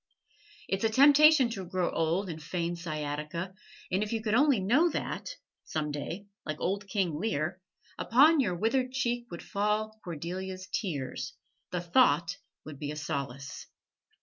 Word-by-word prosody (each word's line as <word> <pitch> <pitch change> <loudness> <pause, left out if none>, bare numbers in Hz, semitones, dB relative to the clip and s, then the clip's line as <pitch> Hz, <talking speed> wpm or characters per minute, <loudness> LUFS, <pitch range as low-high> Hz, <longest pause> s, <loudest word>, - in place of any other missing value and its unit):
It's 195 +2 -1
a 225 - +4
temptation 285 +1 +7
to 195 -4 -4
grow 180 0 -1
old 165 +5 0
and 160 -3 -6
feign 170 +2 -2
sciatica; 155 +2 -4 0.4
and 185 +2 +1
if 210 - -2
you 225 -1 -1
could 215 -1 0
only 275 -1 +5
know 255 - +4
that, - - -3 0.3
some 150 -1 -2
day, 165 +7 -5 0.2
like 155 0 -4
old 195 +2 -1
King 185 -7 0
Lear, 180 -3 -1 0.4
upon 290 +7 +5
your 185 -10 +1
withered 250 +7 +1
cheek 240 -2 -1
would 170 - -7
fall 215 +2 -1
Cordelia's 185 +3 -5
tears, 140 - -3 0.4
the 180 - -2
thought 175 -2 +3 0.3
would 145 -3 -9
be 145 - -4
a 150 - -4
solace. 140 -2 -5
185 Hz, 150 wpm, -30 LUFS, 160-225 Hz, 0.4 s, temptation